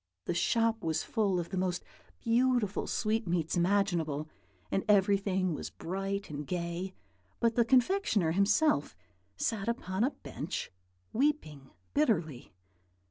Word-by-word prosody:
The - - 0
shop 225 +5 +2
was 160 -1 0
full 200 -5 +1
of 170 - -4
the 190 - -2
most 180 -1 -1 0.4
beautiful 235 -3 +2
sweetmeats 190 -7 0
imaginable, 175 -5 +1 0.4
and 195 - +1
everything 195 -2 +3
was - - -5
bright 195 +3 -3
and 145 -1 -5
gay; 175 +1 -3 0.4
but 230 -1 +3
the 235 - +4
confectioner 245 - +3
himself 200 - +2 0.4
sat 220 -2 -1
upon 205 -4 -1
a 260 - +3
bench, 175 - -6 0.4
weeping 215 - 0 0.2
bitterly. 175 - 0
195 Hz, 120 wpm, -31 LUFS, 170-225 Hz, 0.4 s, the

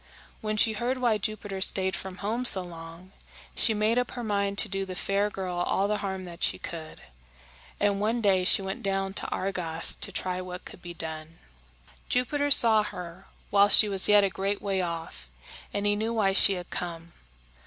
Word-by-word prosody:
When 215 0 -2
she 220 +1 +3
heard 240 +4 -2
why 235 -4 +1
Jupiter 205 -2 -5
stayed 190 -1 +1
from 190 0 -6
home 230 +4 -1
so 190 -6 +4
long, 170 +1 -11 0.4
she 220 - +2
made 215 +3 +2
up 250 - -2
her 240 - -4
mind 200 -2 -1
to - - +5
do 195 0 -1
the 185 -1 -7
fair 200 +2 0
girl 185 -3 -5
all 190 +2 0
the 210 0 0
harm 190 -1 -4
that 175 -1 -11
she - - +2
could; 160 -2 -8 0.8
and 205 -1 +1
one 225 +3 0
day 195 -4 +2
she 195 - +3
went 190 +1 -5
down 195 -1 -2
to 205 - +1
Argos 175 -4 +1
to 200 - -2
try 185 -1 -3
what 180 0 -8
could - - -12
be 175 -1 -9
done. 160 0 -6 0.7
Jupiter 285 +4 0
saw 225 -5 +7
her 180 -2 -8 0.2
while 200 0 +5
she 215 - +6
was 195 -1 +1
yet 205 -1 +6
a 195 - +2
great 200 +2 -2
way 195 -2 -1
off, 165 - -6 0.4
and 205 0 -3
he 205 0 +2
knew 220 +2 -2
why 195 -3 +2
she 195 - +5
had 180 -2 -7
come. 170 -1 -6
195 Hz, 195 wpm, -27 LUFS, 180-210 Hz, 0.8 s, saw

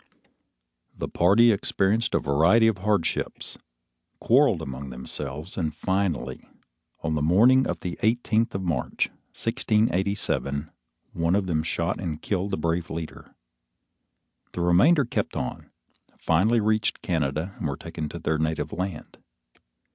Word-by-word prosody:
The - - -3
party 105 +7 +5
experienced 105 +2 +1
a - - +4
variety 80 +11 +4
of 110 -4 +2
hardships, 100 -3 -1 0.6
quarrelled - - +3
among 65 +1 -6
themselves, 70 +7 -5
and 80 -3 -2
finally, 95 -2 -1 0.6
on 80 -1 -1
the 75 - 0
morning 115 - +5
of - - -3
the 90 -1 -5
eighteenth 115 0 +1
of 95 - -2
March, 85 -4 -1 0.3
1687, 95 - 0 0.4
one 85 +2 +1
of 100 -1 +1
them 80 -4 0
shot 85 +2 -2
and 80 -5 -4
killed 100 0 -2
the 95 - -2
brave 85 +1 -1
leader. 80 -1 -7 1.2
The 90 - -3
remainder 125 - +4
kept - - -2
on, - - -4 0.5
finally 100 +9 +2
reached 110 -1 0
Canada 80 +2 -1
and - - -2
were 70 - -3
taken 75 -1 -6
to - - -7
their 80 -1 -1
native 80 0 -1
land. 90 -3 -5
90 Hz, 130 wpm, -25 LUFS, 80-105 Hz, 1.2 s, party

